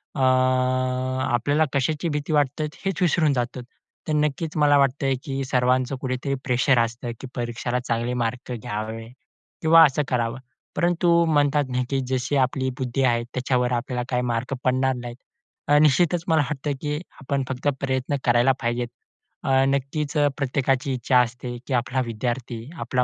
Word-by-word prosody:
अ - - -4
आपल्याला 130 +2 +1
कशाची 150 +4 0
भीती 150 +1 -2
वाटते 145 0 +1 0.2
हेच 195 -2 -1
विसरून 160 -4 +3
जातो. 125 0 -2 0.5
तर 155 - 0
नक्कीच 150 +2 -1
मला 145 -1 +5
वाटतंय, 135 0 +2
की 135 -1 -3
सर्वांचं 130 0 +1
कुठेतरी 130 +1 -2
प्रेशर 130 0 +3
असतं, 120 +1 -2
की 135 - -7
परीक्षेला 120 +1 -2
चांगले 120 0 -2
मार्क 125 +2 -4
घ्यावे 110 0 -5 0.5
किंवा 165 +1 +7
असं 150 0 +1
करावं, 120 0 -1 0.4
परंतु 170 0 +3
म्हणतात 145 -2 +2
ना 125 0 0
की 135 -1 0
जशी 130 +2 -1
आपली 130 0 +1
बुद्धी 130 +1 -1
आहे 120 -2 +2
त्याच्यावर 125 0 -1
आपल्याला 125 +1 -2
काही 125 -1 +1
मार्क 120 +1 -2
पडणार 130 +1 +2
नाहीत. 120 -1 -7 0.5
अ, 145 0 +5
निश्चितच 165 +3 +3
मला 160 -2 +4
वाटतं, 145 0 -3
की 150 -1 -2 0.3
आपण 140 0 -1
फक्त 135 +2 -3
प्रयत्न 130 +1 -1
करायला 120 +2 +4
पाहिजेत. 120 0 -1 0.6
अ, 135 0 +3
नक्कीच 140 +3 -1
अ, 145 -1 +4
प्रत्येकाची 135 -1 0
इच्छा 125 0 +2
असते, 120 0 -4
की 135 - -2
आपला 125 +2 0
विद्यार्थी, 120 +1 -4
आपला 125 -1 0
130 Hz, 155 wpm, -24 LUFS, 125-145 Hz, 0.6 s, किंवा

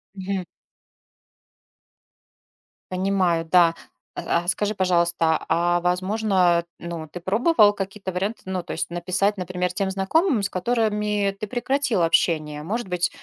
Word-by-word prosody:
Мгм. 190 -1 -3 2.5
Понимаю, 185 -3 +1
да. 170 0 +5 0.4
А 170 - -1
а - - -12
скажи, 205 +2 0
пожалуйста, 170 -3 +1
а 175 +1 +2
возможно, 180 -1 +1
ну 170 -2 -6
ты 175 +3 -9
пробовал 210 - +4
какие-то 195 -1 -5
варианты? 200 +5 -3
Ну 185 -1 -3
то - - -6
есть 170 - -3
написать, 185 +4 0
например, 180 0 -2
тем 195 +1 -1
знакомым, 215 - +1
с - - 0
которыми 210 -1 0
ты 215 - -4
прекратил 255 -3 0
общение. 155 -3 +1
Может 215 +3 -3
быть, 180 0 0
185 Hz, 125 wpm, -23 LUFS, 175-205 Hz, 2.5 s, да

